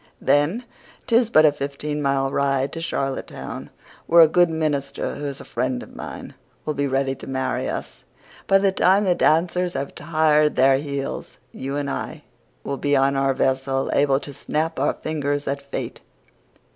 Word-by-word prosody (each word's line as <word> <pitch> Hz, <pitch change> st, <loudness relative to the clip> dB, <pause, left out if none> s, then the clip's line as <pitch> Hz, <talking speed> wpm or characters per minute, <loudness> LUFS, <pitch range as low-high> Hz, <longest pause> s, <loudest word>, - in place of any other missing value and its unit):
Then 165 Hz, +12 st, +2 dB, 0.4 s
'tis 235 Hz, -1 st, +3 dB
but 155 Hz, -8 st, +6 dB
a 150 Hz, -, +6 dB
fifteen 145 Hz, +1 st, -4 dB
mile 135 Hz, -1 st, +1 dB
ride 135 Hz, -1 st, 0 dB
to 165 Hz, -, -5 dB
Charlottetown, 135 Hz, -5 st, -4 dB, 0.4 s
where 170 Hz, 0 st, +7 dB
a 160 Hz, -, +9 dB
good 175 Hz, +2 st, +4 dB
minister, 145 Hz, -4 st, -2 dB
who 145 Hz, -, -6 dB
is 140 Hz, -1 st, -5 dB
a -, -, -10 dB
friend 125 Hz, +1 st, -2 dB
of -, -, -14 dB
mine, -, -, -8 dB, 0.3 s
will 150 Hz, -, -1 dB
be 140 Hz, -1 st, -1 dB
ready 135 Hz, 0 st, 0 dB
to -, -, -10 dB
marry 130 Hz, 0 st, -1 dB
us. -, -, -6 dB, 0.4 s
By 195 Hz, -, +6 dB
the 195 Hz, 0 st, +2 dB
time 190 Hz, +2 st, +3 dB
the 185 Hz, -3 st, +3 dB
dancers 175 Hz, +2 st, +2 dB
have 140 Hz, -, -3 dB
tired 155 Hz, -2 st, +2 dB
their 135 Hz, +1 st, +5 dB
heels 140 Hz, -1 st, -5 dB
you 135 Hz, +1 st, -5 dB
and 145 Hz, -1 st, -2 dB
I 150 Hz, +2 st, -5 dB, 0.4 s
will 140 Hz, -, -3 dB
be 145 Hz, +1 st, +1 dB
on 135 Hz, 0 st, +3 dB
our 135 Hz, 0 st, +1 dB
vessel, 135 Hz, 0 st, 0 dB
able 140 Hz, -1 st, +3 dB
to 145 Hz, -, -8 dB
snap 155 Hz, +3 st, -2 dB
our 140 Hz, -, +2 dB
fingers 145 Hz, -2 st, -2 dB
at 140 Hz, 0 st, -2 dB
fate. 140 Hz, 0 st, -6 dB
145 Hz, 175 wpm, -23 LUFS, 135-160 Hz, 0.4 s, a